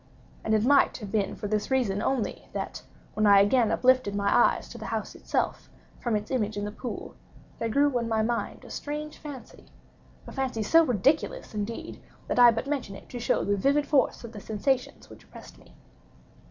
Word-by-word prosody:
And 220 - +2
it 215 +1 +2
might 280 +1 +4
have 210 -5 -8
been 205 -3 0
for 205 - -5
this 210 0 -1
reason 235 -7 +1
only, 265 -4 -2
that, - - -4 0.3
when 215 0 +2
I 200 -1 +8
again 220 +3 +3
uplifted 255 -5 +3
my 200 0 +1
eyes 245 - +3
to - - -9
the - - -6
house - - -3
itself, - - -2 0.3
from 235 -3 -1
its 210 +3 -3
image 215 -5 -1
in 205 - -2
the 205 - -4
pool, 245 +3 -7 0.5
there 230 - -1
grew 280 +3 +2
in 235 - -3
my 220 -1 +1
mind 235 +1 -3
a - - -11
strange 300 +1 -5
fancy—a 290 -5 -13
fancy 260 -5 -2
so 330 +10 +5
ridiculous, 265 - 0
indeed, 215 +2 -5 0.3
that - - 0
I 245 -1 +9
but 230 +2 -1
mention 275 -8 -3
it - - -13
to 245 - -6
show - - +1
the 205 - +1
vivid 280 +8 +2
force 285 -4 +1
of 235 - -8
the 210 -3 -9
sensations 250 +5 -2
which - - -14
oppressed - - -14
me. - - -20
235 Hz, 195 wpm, -27 LUFS, 210-265 Hz, 0.5 s, I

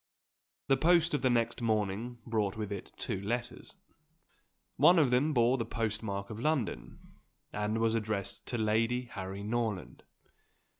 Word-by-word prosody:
The 135 - +4
post 170 +2 +4
of 145 - +1
the 130 - +3
next 120 0 +1
morning 110 +1 -1
brought 110 -4 -1
with 105 -2 -4
it 100 -2 -6
two 95 - -3
letters. 120 +4 -4 1.0
One 170 +7 +6
of 145 -6 +4
them 135 +5 +3
bore 125 -1 +3
the - - +1
postmark 105 -3 -3
of 110 - -6
London, 145 -3 -3 0.3
and 105 +1 -1
was 115 0 +2
addressed 105 -3 -3
to 120 - -2
Lady 115 +3 +1
Harry 100 -4 -6
Norland. 110 -3 -2
115 Hz, 145 wpm, -31 LUFS, 105-125 Hz, 1.0 s, One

